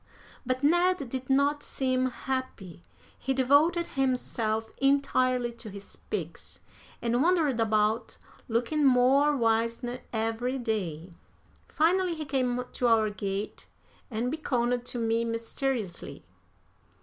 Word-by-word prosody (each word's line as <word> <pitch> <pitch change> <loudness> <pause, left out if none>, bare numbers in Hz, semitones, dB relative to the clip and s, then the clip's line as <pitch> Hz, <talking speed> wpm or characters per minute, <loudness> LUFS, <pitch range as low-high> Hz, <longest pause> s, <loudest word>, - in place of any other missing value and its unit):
But 255 +1 -1
Ned 345 -2 +3
did 260 +1 -5
not 280 +2 +3
seem 255 -2 0
happy. 255 -10 -5 0.4
He 265 0 -1
devoted 290 +7 +4
himself 230 -5 -1
entirely 255 -3 +2
to 230 -1 -10
his 200 0 -10
pigs, - - -6 0.4
and 240 +1 +1
wandered 315 -7 +2
about 215 0 +1 0.3
looking 245 +6 0
more 275 +3 +4
wizened 230 +1 0
every 225 +3 -1
day. 190 -8 -3 0.6
Finally 350 +2 +2
he 310 -1 -5
came 250 -3 0
to 245 - 0
our 220 -2 +3
gate 200 0 -4 0.4
and 240 +1 -2
beckoned 245 -5 0
to 245 - -5
me 230 0 +1
mysteriously. 230 - -3
250 Hz, 115 wpm, -28 LUFS, 225-275 Hz, 0.6 s, devoted